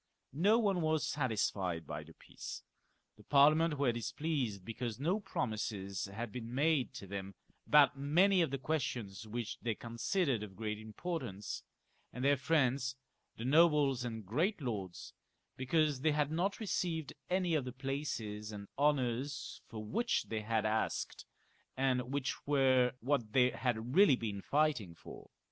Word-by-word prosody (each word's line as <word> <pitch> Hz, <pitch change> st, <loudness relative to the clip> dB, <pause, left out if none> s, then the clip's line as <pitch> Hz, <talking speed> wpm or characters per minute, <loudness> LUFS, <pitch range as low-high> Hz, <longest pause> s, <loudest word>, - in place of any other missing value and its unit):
No 200 Hz, +10 st, +4 dB
one 200 Hz, -6 st, +2 dB
was 155 Hz, -1 st, +1 dB
satisfied 100 Hz, -, -1 dB
by 75 Hz, -, -5 dB
the 80 Hz, +1 st, -14 dB
peace: -, -, -9 dB, 0.5 s
the 105 Hz, -, -16 dB
Parliament, 150 Hz, +4 st, +5 dB, 0.9 s
because 115 Hz, +2 st, -4 dB
no 175 Hz, +9 st, +1 dB
pro 195 Hz, -, -2 dB
mises 100 Hz, -4 st, -3 dB
had 110 Hz, +2 st, -5 dB
been 120 Hz, +1 st, -6 dB
made 145 Hz, -1 st, +2 dB
to 115 Hz, -, -7 dB
them 100 Hz, 0 st, -6 dB, 0.3 s
about 145 Hz, -2 st, +6 dB
many 180 Hz, +7 st, +4 dB
of 165 Hz, -, +2 dB
the 135 Hz, -, -2 dB
questions 120 Hz, -8 st, -3 dB
which 115 Hz, 0 st, -4 dB
they 115 Hz, -2 st, -1 dB
considered 120 Hz, -, -1 dB
of 100 Hz, -3 st, -8 dB
great 105 Hz, 0 st, -3 dB
importance, 110 Hz, -, -5 dB, 0.5 s
and 125 Hz, +2 st, -4 dB
their 145 Hz, 0 st, +5 dB
friends, 130 Hz, -2 st, +1 dB, 0.4 s
the 115 Hz, -, -5 dB
nobles 145 Hz, -3 st, +4 dB
and 115 Hz, -3 st, -5 dB
great 170 Hz, -, 0 dB
lords, 100 Hz, -, -5 dB, 0.4 s
because 145 Hz, +1 st, +1 dB
they 155 Hz, +1 st, +3 dB
had 150 Hz, 0 st, +1 dB
not 180 Hz, +5 st, 0 dB
received 170 Hz, -, -2 dB, 0.2 s
any 180 Hz, -2 st, +1 dB
of 150 Hz, -4 st, +2 dB
the 125 Hz, -, -5 dB
places 120 Hz, -6 st, -4 dB
and 100 Hz, -1 st, -8 dB
honours 135 Hz, -1 st, 0 dB
for 110 Hz, -1 st, -7 dB
which 235 Hz, -, 0 dB
they 110 Hz, -1 st, -2 dB
had 110 Hz, 0 st, 0 dB
asked, 110 Hz, +1 st, -1 dB, 0.5 s
and 130 Hz, -1 st, +1 dB
which 140 Hz, -1 st, -3 dB
were 130 Hz, -3 st, +4 dB
what 120 Hz, -4 st, 0 dB
they 125 Hz, -1 st, +5 dB
had 120 Hz, -1 st, -2 dB
really 195 Hz, -6 st, +7 dB
been 105 Hz, -5 st, -4 dB
fighting 140 Hz, -, +1 dB
for. -, -, -12 dB
130 Hz, 150 wpm, -34 LUFS, 110-150 Hz, 0.9 s, really